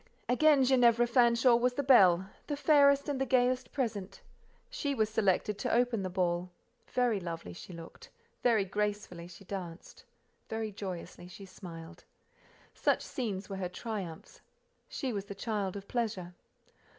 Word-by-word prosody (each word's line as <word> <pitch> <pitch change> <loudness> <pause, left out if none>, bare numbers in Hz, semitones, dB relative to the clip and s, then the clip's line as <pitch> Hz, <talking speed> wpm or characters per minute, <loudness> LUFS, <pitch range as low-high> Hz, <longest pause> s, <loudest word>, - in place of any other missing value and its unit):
Again 285 +2 +4
Ginevra 240 -2 +4
Fanshawe 235 0 +4
was 250 +1 +1
the 285 - -1
belle, 190 -9 +6 0.2
the 290 - -2
fairest 280 -2 +4
and 280 -2 -2
the - - +2
gayest 250 0 +1
present; 220 -8 -3 0.5
she 395 - -3
was 220 -3 +1
selected 205 -1 +1
to - - -1
open 240 -2 +2
the 185 - -3
ball: 175 -1 -1 0.4
very 245 -5 +1
lovely 165 - -6
she 135 - -11
looked, 165 -1 -11 0.3
very 225 -5 +3
gracefully 205 -3 -3
she 180 +3 -14
danced, 180 -3 -8 0.5
very 220 -1 -3
joyously 185 -3 -7
she 195 +2 -11
smiled. 175 -2 -11 0.7
Such - - +1
scenes 210 -7 -4
were 195 - -5
her 185 -2 -3
triumphs—she 220 - -7
was 200 -1 -3
the 200 - -8
child 205 -2 -2
of 200 0 -8
pleasure. 205 -7 -3
210 Hz, 145 wpm, -31 LUFS, 185-250 Hz, 0.7 s, belle